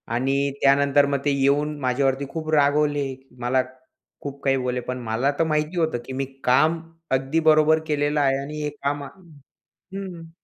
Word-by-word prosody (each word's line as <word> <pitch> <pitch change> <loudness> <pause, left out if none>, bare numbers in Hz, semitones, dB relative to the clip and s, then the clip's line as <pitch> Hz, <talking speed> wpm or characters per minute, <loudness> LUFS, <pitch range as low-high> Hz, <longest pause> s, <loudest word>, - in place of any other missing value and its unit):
आणि 135 +3 +1
त्यानंतर 140 +1 +4
मग 140 0 -1
ते 145 - +3
येऊन 145 +2 +1
माझ्यावरती 135 +1 0
खूप 155 0 -5
रागवले. 145 -1 +2 0.2
मला 130 +2 +2 0.6
खूप 140 -1 -7
काही 135 -1 +2
बोलले, 125 -1 -2
पण 125 +1 -5
मला 115 +5 0
तर - - +4
माहिती 155 +2 -1
होतं, 160 -6 +1
की 130 - -7
मी 135 +1 -2 0.2
काम 155 +6 +3 0.4
अगदी 135 +5 -1
बरोबर 155 0 +4
केलेलं 150 0 0
आहे 135 -1 +2
आणि 150 +2 -6
हे 150 - -1
काम 145 0 -1 0.7
हं. 185 -4 -9
140 Hz, 160 wpm, -23 LUFS, 135-150 Hz, 0.7 s, त्यानंतर